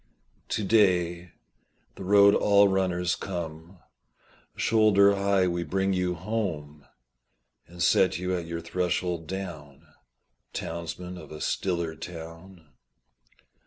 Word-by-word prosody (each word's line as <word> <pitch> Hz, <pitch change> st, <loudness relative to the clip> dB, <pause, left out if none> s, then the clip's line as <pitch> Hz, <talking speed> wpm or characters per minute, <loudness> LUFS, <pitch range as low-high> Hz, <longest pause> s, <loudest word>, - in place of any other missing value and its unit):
To 110 Hz, -, -1 dB
day, 90 Hz, -5 st, +2 dB, 0.6 s
the -, -, -9 dB
road 100 Hz, +1 st, +6 dB
all 100 Hz, 0 st, +5 dB
runners 90 Hz, -2 st, 0 dB
come, 85 Hz, -1 st, -7 dB, 0.8 s
Shoulder 105 Hz, -2 st, +4 dB
high 100 Hz, -1 st, +2 dB
we 85 Hz, -1 st, -1 dB
bring 95 Hz, +2 st, 0 dB
you 90 Hz, -1 st, 0 dB
home, 85 Hz, -7 st, -4 dB, 0.8 s
And 85 Hz, 0 st, -5 dB
set 95 Hz, +2 st, +3 dB
you 90 Hz, +1 st, -2 dB
at 85 Hz, -2 st, -4 dB
your 85 Hz, 0 st, -4 dB
threshold 90 Hz, -1 st, -2 dB
down, 80 Hz, -8 st, -7 dB, 0.7 s
Townsman 85 Hz, +2 st, -6 dB
of -, -, -12 dB
a 75 Hz, -, -8 dB
stiller 85 Hz, -3 st, -2 dB
town. 85 Hz, +1 st, -10 dB
90 Hz, 110 wpm, -27 LUFS, 85-95 Hz, 0.8 s, road